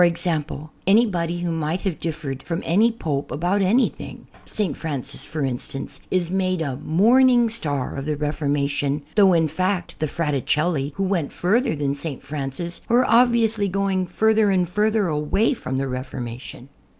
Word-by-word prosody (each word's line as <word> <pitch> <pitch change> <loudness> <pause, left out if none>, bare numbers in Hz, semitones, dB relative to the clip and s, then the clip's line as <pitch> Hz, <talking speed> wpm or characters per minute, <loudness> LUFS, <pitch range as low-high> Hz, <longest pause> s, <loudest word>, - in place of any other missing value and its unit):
e.g. 170 +1 +1 0.6
:\nybody 180 -5 +2
who 175 - -1
may 160 +1 -1
have 190 -4 -3
differed 150 -5 -4
from 170 -1 -4
any 215 +8 +4
Pope 150 -10 -3
aljout 180 +6 0
anything 215 +7 0 0.2
(St. 195 -9 -2
Francis, 145 -6 -5
for 150 -2 -3
instance) 135 +1 -5
is 180 -2 0
made 185 -1 0
a 140 -5 -2
morning 235 - +4
star 145 - -3
of 135 0 -5
the 150 -1 -1
Reformation; 145 -1 -1
though 195 -3 +6
in 165 -2 +3
fact 185 +3 -2
the 155 - 0
Fraticelli, 150 0 0
who 195 - -1
went 185 -6 0
further 215 +3 +1
than 145 -1 -1
St. 145 -1 -6
Francis, 145 +4 -5
were 245 +2 +4
ob 240 +2 +5
viously 225 -3 +1
going 190 -1 0
further 220 +3 +3
and 185 -2 +2
further 210 +2 +1
away 155 - +1
from 130 - -4
the 135 - 0
Refor 130 0 -4
mation. 120 +2 -7
170 Hz, 160 wpm, -23 LUFS, 145-200 Hz, 0.6 s, though